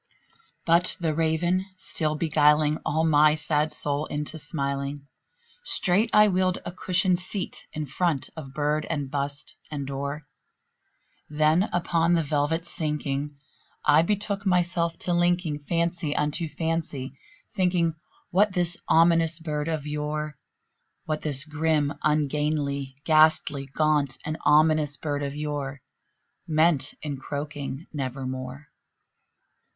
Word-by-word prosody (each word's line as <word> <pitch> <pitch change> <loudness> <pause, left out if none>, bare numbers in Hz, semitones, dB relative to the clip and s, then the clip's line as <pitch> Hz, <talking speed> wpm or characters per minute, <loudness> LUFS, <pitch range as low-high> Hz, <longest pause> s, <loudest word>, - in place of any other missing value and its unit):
'" 455 - -33 0.2
But 170 +2 +3
the 165 -3 0
Raven 165 +3 +1
still 155 -4 -1
beguiling 150 -1 +3
all 160 +2 0
my 150 -1 +5
sad 150 0 0
soul 145 +1 0
into 150 +2 -4
smiling, 140 -1 -3 0.6
Straight 210 - +3
I 210 0 +6
wheeled 185 -1 +1
a - - -4
cushioned 185 0 +2
seat 185 +1 -3
in 155 -1 -4
front 150 0 -1
of 145 -5 -8
bird 150 +2 -1
and 145 -4 -3
bust 140 0 -4
and 145 -2 -4
door; 140 +2 -4 1.1
Then, 155 +6 +2
upon 170 -1 +2
the 165 - +2
velvet 150 +3 0
sinking, 150 -3 -3 0.5
I 150 - +6
betook 200 +2 -1
myself 175 -3 +1
to 175 - 0
linking 175 -3 +1
Fancy 165 0 -1
unto 150 +2 -1
fancy, 150 -4 -3 0.4
thinking 180 -4 +1 0.4
what 200 +2 +3
this 175 -1 0
ominous 165 -1 +4
bird 150 -2 -3
of 155 -3 -2
yore 150 0 -3 0.7
What 155 -1 -2
this 145 -2 +1
grim, 155 -2 0
ungainly, 150 -2 0
ghastly, 155 -3 +3
gaunt, 145 -1 +1
and 155 +1 -3
ominous 155 -2 +4
bird 145 +1 -3
of 140 0 -3
yore 145 -2 -4 0.6
Meant 155 -2 +2
in 145 -2 -3
croaking 145 +1 -5
"Nevermore." 130 0 -5
155 Hz, 125 wpm, -26 LUFS, 145-170 Hz, 1.1 s, I